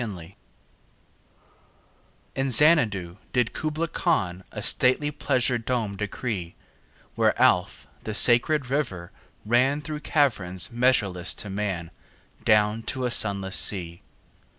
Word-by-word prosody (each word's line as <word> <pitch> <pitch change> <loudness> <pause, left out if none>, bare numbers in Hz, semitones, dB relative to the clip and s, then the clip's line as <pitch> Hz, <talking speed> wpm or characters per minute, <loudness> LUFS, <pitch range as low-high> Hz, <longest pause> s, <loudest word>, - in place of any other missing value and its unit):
Kubla 105 -6 -5
Khan 85 +2 -13 2.0
IN 135 0 -2
Xanadu 110 - +3 0.2
did 125 -3 0
Kubla 155 +2 -3
Khan 95 - -2
A 105 - -7
stately 130 +5 +2
pleasure 125 -3 0
dome 115 -4 -3
decree: 100 -3 -5 0.6
Where - - 0
Alph, 90 0 +1 0.2
the 110 - -5
sacred 125 +4 +4
river, 95 -12 -3 0.3
ran 125 +6 +2
Through 150 0 -6
caverns 110 - -1
measureless 105 -8 +1
to 100 - -7
man 95 -5 -4 0.5
Down 105 +1 +2
to 130 -1 -3
a 125 - -2
sunless 100 -3 +1
sea. 85 -4 +1
110 Hz, 115 wpm, -24 LUFS, 95-130 Hz, 2.0 s, sacred